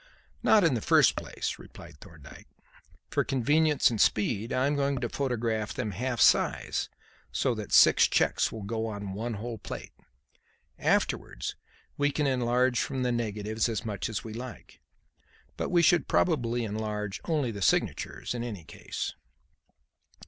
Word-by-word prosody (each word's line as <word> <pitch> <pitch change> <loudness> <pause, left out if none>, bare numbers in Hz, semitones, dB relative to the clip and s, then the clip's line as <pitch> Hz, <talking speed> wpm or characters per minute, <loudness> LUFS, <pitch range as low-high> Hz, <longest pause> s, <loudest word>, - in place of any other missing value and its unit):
"Not 215 -3 +5
in 165 -5 +4
the 115 - -1
first - - +4
place," - - -4
replied 85 -3 -13
Thorndyke. 85 -5 -14 0.6
"For - - +2
convenience 145 +3 +2
and 110 - 0
speed 105 +1 +1
I 130 +1 +1
am 145 +1 +1
going 140 -1 0
to 120 -1 -2
photograph 115 -6 -2
them 105 - -2
half 120 +5 -3
size, - - +3 0.4
so - - +1
that - - -6
six - - +7
cheques - - +1
will 110 -2 -7
go 110 +2 -2
on 100 -3 -5
one 115 +3 -3
whole 115 +2 -6
plate. - - -8 0.9
Afterwards - - 0 0.4
we 145 0 +2
can 150 +1 -1
enlarge 125 -1 +2
from 130 -2 -2
the 125 - +1
negatives 110 -1 -1
as 115 0 -3
much 105 -2 -3
as 110 - -4
we 110 - -7
like. 120 +2 -9 0.7
But - - -3
we 175 -1 +3
should 170 -3 +4
probably 120 -8 +1
enlarge 105 -2 -4
only 150 -8 0
the 100 -2 -7
signatures - - 0
in 120 -1 -3
any 105 -8 -6
case." - - -5
115 Hz, 155 wpm, -28 LUFS, 105-130 Hz, 0.9 s, six